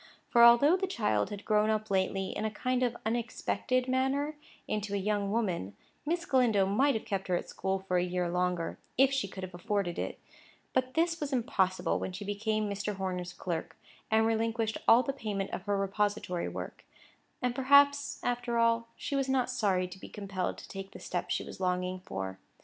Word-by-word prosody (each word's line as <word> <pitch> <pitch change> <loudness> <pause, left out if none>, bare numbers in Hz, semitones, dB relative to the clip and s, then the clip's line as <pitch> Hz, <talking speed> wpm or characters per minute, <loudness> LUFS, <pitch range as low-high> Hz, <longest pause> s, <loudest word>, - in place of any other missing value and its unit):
For, 235 - +6
although 240 +8 +8
the 385 +1 -1
child 160 - 0
had 205 -1 -7
grown 215 0 +3
up 215 -1 -1
lately, 190 0 +1
in 215 - -3
a 220 - +1
kind 250 +4 -1
of 245 -2 +1
unexpected 240 +2 -1
manner, 265 +3 0 0.3
into 210 -1 -2
a - - +1
young 200 0 0
woman, 185 - -1 0.3
Miss 340 +2 0
Galindo 235 -7 +3
might 255 +8 +3
have 220 - -3
kept 195 -2 -2
her 180 - +2
at - - -3
school 190 +1 -1
for 190 -1 -1
a - - +1
year 180 0 -1
longer, 180 -1 -1 0.2
if 270 +1 +5
she 265 -6 0
could 190 0 -8
have 185 -1 -6
afforded 190 -1 -2
it; - - -4 0.5
but 255 0 0
this 330 +1 +2
was 295 -1 -3
impossible 190 -7 +1
when 185 - -4
she 200 +3 -6
became 215 +1 -1
Mr. 200 +1 -3
Horner's 180 -2 -3
clerk, 175 -2 -4 0.3
and 220 0 +4
relinquished 225 0 0
all 235 +3 +7
the 275 - -2
payment 210 -7 -3
of 190 - -5
her 205 -1 +1
repository 200 -2 -1
work; - - -7 0.6
and 250 -1 0
perhaps, 285 +2 +4
after 245 -1 -1
all, 230 0 +3
she 280 - -4
was 270 -1 0
not 255 -1 +1
sorry 195 -7 +1
to 185 +1 -11
be - - -10
compelled 195 -3 -3
to - - -10
take 195 0 -8
the - - -9
step - - -3
she - - 0
was - - -9
longing 180 0 -1
for. 95 - -5
210 Hz, 195 wpm, -31 LUFS, 190-245 Hz, 0.6 s, although